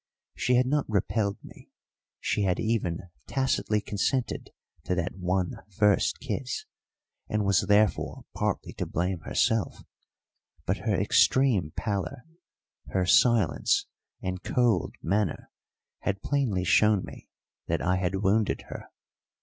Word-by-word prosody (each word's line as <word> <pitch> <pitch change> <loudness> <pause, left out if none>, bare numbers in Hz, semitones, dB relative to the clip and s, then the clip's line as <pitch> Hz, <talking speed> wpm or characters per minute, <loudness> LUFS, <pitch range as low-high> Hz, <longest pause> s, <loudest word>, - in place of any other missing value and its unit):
She 125 - +1
had 125 +1 +4
not 145 0 0
repelled 100 0 0
me, - - -14 0.5
she - - -1
had 95 -3 +1
even 95 -6 -1 0.2
tacitly 105 -6 0
consented 110 +6 -1 0.4
to 90 - 0
that 90 0 -2
one 90 0 -1 0.2
first 105 -1 +3
kiss, 130 -3 -4 0.6
and 105 -1 0
was 100 -2 +2
therefore 105 -4 +2
partly - - -2
to - - -1
blame 90 +1 -1
herself; 110 +6 0 0.8
but - - 0
her - - +3
extreme 115 - +3
pallor, 110 +5 -3 0.6
her 95 -1 0
silence, 110 - +3 0.4
and 95 0 -3
cold 120 -6 +1
manner 100 -1 -1 0.5
had 100 -1 -3
plainly 125 -11 0
shown 105 +2 +4
me - - -12 0.4
that - - -1
I 90 +1 +2
had 95 +2 -1
wounded 105 +2 +2
her. - - -8
100 Hz, 125 wpm, -27 LUFS, 90-115 Hz, 0.8 s, had